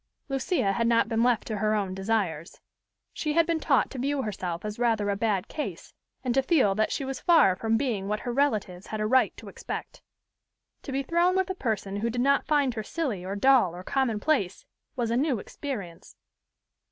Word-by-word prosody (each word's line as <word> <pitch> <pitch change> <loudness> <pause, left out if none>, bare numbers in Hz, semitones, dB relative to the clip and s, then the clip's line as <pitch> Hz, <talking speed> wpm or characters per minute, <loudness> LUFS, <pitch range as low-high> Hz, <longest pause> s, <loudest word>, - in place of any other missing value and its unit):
Lucia 270 - 0
had 230 +3 +1
not 230 -1 +3
been 225 -1 0
left 240 -2 +2
to 215 - -3
her 215 +1 +1
own 195 -3 -1
desires. 190 -5 -2 0.5
She 300 -1 -2
had 335 +1 +4
been 330 -1 0
taught 280 -4 +2
to 265 - -6
view 275 +1 0
herself 185 -4 -4
as 210 +1 -5
rather 220 -4 +1
a - - 0
bad 200 -3 0
case, 300 - -6 0.3
and 250 -2 0
to 270 - +3
feel 265 - +3
that 215 +2 0
she 275 - -2
was 270 0 -4
far 325 - +5
from 225 +3 0
being 225 -7 -1
what 210 +1 -2
her 245 - -3
relatives 215 -9 0
had 215 - -4
a 215 - 0
right 260 +4 +3
to - - -11
expect. - - -7 0.8
To - - -7
be 270 +1 -1
thrown 345 +5 +2
with 380 0 +1
a - - -1
person 215 - -2
who 225 +3 -1
did 245 +1 -1
not 280 +2 +2
find 285 -4 +2
her 220 - -3
silly 245 - -3
or 190 +2 -4
dull 230 -6 +4
or 180 - -8
commonplace, 230 - 0 0.3
was 235 -3 -1
a - - +1
new 275 -2 +1
experience. 200 - -7
230 Hz, 205 wpm, -27 LUFS, 205-275 Hz, 0.8 s, far